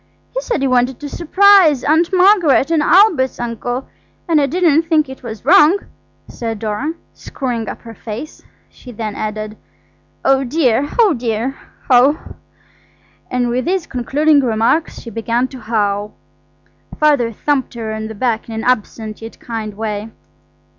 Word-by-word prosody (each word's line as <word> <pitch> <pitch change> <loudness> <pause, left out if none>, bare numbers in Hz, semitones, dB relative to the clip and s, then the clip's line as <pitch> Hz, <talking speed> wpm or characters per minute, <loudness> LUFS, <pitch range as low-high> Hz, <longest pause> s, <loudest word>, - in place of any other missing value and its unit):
He - - -2
said 475 - -2
he - - +2
wanted 250 0 +1
to 295 - -5
surprise 355 -4 +4
Aunt 325 +4 +2
Margaret 365 -6 +4
and 325 -2 +2
Albert's 335 - +3
uncle. 240 +2 -4 0.4
And 320 -3 +3
I 280 - +2
didn't 325 0 +3
think 320 -3 +1
it 265 0 -10
was 225 -2 -8
wrong," 350 +2 +6 0.5
said 225 -2 -5
Dora, 220 +9 -3 0.2
screwing 240 -5 -4
up - - -8
her 230 -1 -10
face; 225 +7 -8 0.3
she 250 - -14
then 215 -2 -5
added, 215 0 -5 0.7
"Oh 270 0 +3
dear, 270 0 +1
oh 440 -7 +5
dear, 235 +1 -2 0.3
oh, 265 +4 +5
oh!" - - -13 0.9
and 245 -1 0
with 250 +2 -1
these 365 0 -1
concluding 285 +4 +1
remarks 235 +5 0
she 230 - -10
began 230 +3 -1
to 260 - -10
howl. 210 -2 -2 0.8
Father 285 -7 +3
thumped 270 +3 -2
her 220 -2 -4
on 220 0 -4
the 220 - -8
back 230 0 -2
in 225 - -6
an 220 - -4
absent 220 -3 -2
yet 225 0 -10
kind 220 -3 -6
way. 215 0 -4
250 Hz, 155 wpm, -17 LUFS, 225-305 Hz, 0.9 s, wrong